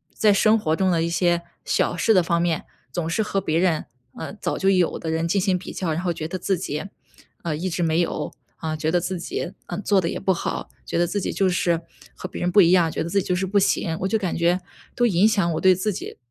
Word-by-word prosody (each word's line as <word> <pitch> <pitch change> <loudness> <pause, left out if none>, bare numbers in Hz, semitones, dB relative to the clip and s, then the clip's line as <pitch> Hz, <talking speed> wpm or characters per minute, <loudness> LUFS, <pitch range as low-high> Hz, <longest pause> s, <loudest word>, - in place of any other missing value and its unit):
在 210 -1 +4
生 215 +3 +4
活 160 -7 0
中 190 -1 +2
的 165 -2 +2
一 170 - 0
些 175 0 +2 0.2
小 175 - +1
事 225 - +3
的 185 -3 +5
方 170 0 +1
面， 170 -2 0 0.3
总 165 +4 -3
是 220 - 0
和 195 -2 -1
别 160 -2 0
人 175 -4 +1 0.3
呃， - - -6
早 - - -3
就 195 - +2
有 180 -3 +2
的 160 - -4
人 165 +1 0
进 195 +2 +1
行 185 -1 +1
比 - - -8
较。 175 -4 -2
然 165 +3 -1
后 175 -2 0
觉 155 - -5
得 185 +3 -4
自 190 0 0
己， 150 0 -4 0.6
呃， 165 -3 -1
一 185 +3 -2
直 170 +1 -1
没 160 +1 +2
有， 170 - -1 0.3
呃， 155 -1 -2
觉 155 +1 -1
得 175 +1 +2
自 180 0 -3
己， 175 +1 -4
呃， - - -5
做 200 -2 +3
得 165 - 0
也 - - -3
不 190 - +1
好， 175 - -3 0.2
觉 - - -2
得 175 - +3
自 200 +4 -2
己 - - -3
就 195 -1 +2
是 170 -2 +1 0.3
和 - - -7
别 - - -7
人 180 - 0
不 200 +2 +6
一 170 0 +5
样， 175 -3 +4
觉 - - -2
得 170 - -4
自 195 +2 +2
己 - - -7
就 180 - +1
是 190 +1 0
不 200 +2 +2
行。 165 -4 +1
我 190 - 0
就 220 - +1
感 185 -6 -2
觉 175 +2 +2 0.3
都 240 - +2
影 200 -1 +4
响 195 -6 +2
我 - - -1
对 185 -1 +5
自 205 +4 -1
己 - - -7
180 Hz, 295 characters per minute, -23 LUFS, 170-190 Hz, 0.6 s, 不